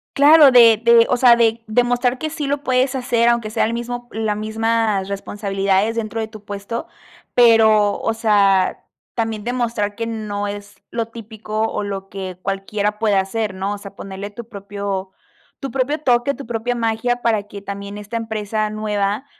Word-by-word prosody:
Claro, 290 0 +7
de 230 -3 +7
de, 235 0 +6
o - - +3
sea, 245 -1 +6
de 230 0 +2
demostrar 245 +2 +1
que 310 +4 -3
sí 305 -1 -4
lo 285 +1 -2
puedes 255 0 +1
hacer, 240 -2 +2
aunque 235 -2 0
sea 215 - 0
el 225 - 0
mismo 240 +1 -5
la 220 -1 -1
mismas 220 -2 0
responsabilidades, 200 +1 -1
dentro 225 0 -3
de 220 - -2
tu 215 -2 -13
puesto, 205 +3 -5 0.5
pero, 220 -3 +5
o 225 - -1
sea, 200 -4 +2 0.3
también 225 -2 -2
demostrar 235 -4 -1
que 230 +1 -3
no 210 -2 -3
es 205 0 -9
lo 230 -1 -2
típico 220 -1 -6
o - - -2
lo 195 -1 -5
que 185 -2 -6
cualquiera 200 +2 -2
puede 215 -2 +2
hacer, 195 +2 -1
¿no?, 195 +2 -2
o - - -8
sea, 200 -1 -11
ponerle 195 +1 -7
tu 235 +2 -10
propio 200 -2 -5 0.5
tu 275 - -4
propio 270 +3 0
toque, 245 0 +2
tu 280 - -9
propia 235 +1 -2
magia 235 +1 -1
para 220 -4 +1
que 205 0 -10
también 200 0 -7
esta 210 +3 -5
empresa 215 -1 -2
nueva 210 +2 -2
220 Hz, 175 wpm, -20 LUFS, 205-235 Hz, 0.5 s, Claro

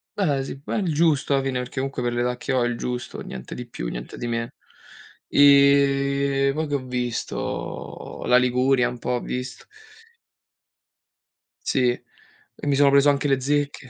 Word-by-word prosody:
ehm, 190 -8 +1
eh 135 - -2
sì. 135 0 -8
Ma - - -3
è - - +1
il 175 -6 -1
giusto 150 -3 +2
alla 135 -1 +2
fine, 130 -2 -1
perché 125 0 -7
comunque 135 -2 -3
per 120 - -1
l'età 120 +1 0
che 135 - -4
ho 125 - +2
è - - +2
il 120 -1 -3
giusto, 125 0 -5
niente 65 -1 -8
di 125 - -7
più, - - -5
niente - - -7
di 120 - -4
meno. 115 0 -2 0.8
Ehm, 140 -1 +4
poi 155 +1 -2
che 145 - -1
ho 130 -2 -3
visto, 125 -2 -4
la 125 - +5
Liguria 125 +1 +2
un 125 - -8
po' 125 - -3
ho 125 -1 0
visto. 125 0 -5 2.0
Sì, 125 -2 +2
e 120 +3 -9
mi 140 - +3
sono 140 0 +5
preso 140 +1 +5
anche 140 0 +1
le 135 -1 +2
zecche. 140 0 -1
135 Hz, 185 wpm, -23 LUFS, 125-140 Hz, 2.0 s, la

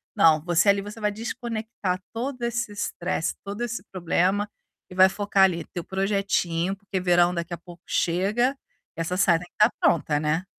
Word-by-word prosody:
Não. 160 -2 +5
Você 175 +3 +3
ali, 200 0 +4
você 210 +2 -9
vai 210 - +1
desconectar 220 -4 -4
todo 250 +2 -4
esse 235 -2 -1
estresse, 180 -4 -2
todo 200 +3 -6
esse 230 -5 -4
problema 185 +3 +1 0.4
e 180 - -11
vai 190 0 +7
focar 200 -1 +2
ali 170 -4 +2
teu 175 - -4
projetinho, 190 -2 0
porque 195 -2 -4
verão 175 -1 +4
daqui 170 0 -4
a - - -3
pouco 175 0 -14
chega, 210 +10 +1 0.4
essa 165 +2 -2
saia 170 -3 +4
tem 180 - -10
que - - -65
estar - - 0
pronta, 150 -3 +2
né. 155 +4 0
190 Hz, 175 wpm, -25 LUFS, 175-210 Hz, 0.4 s, vai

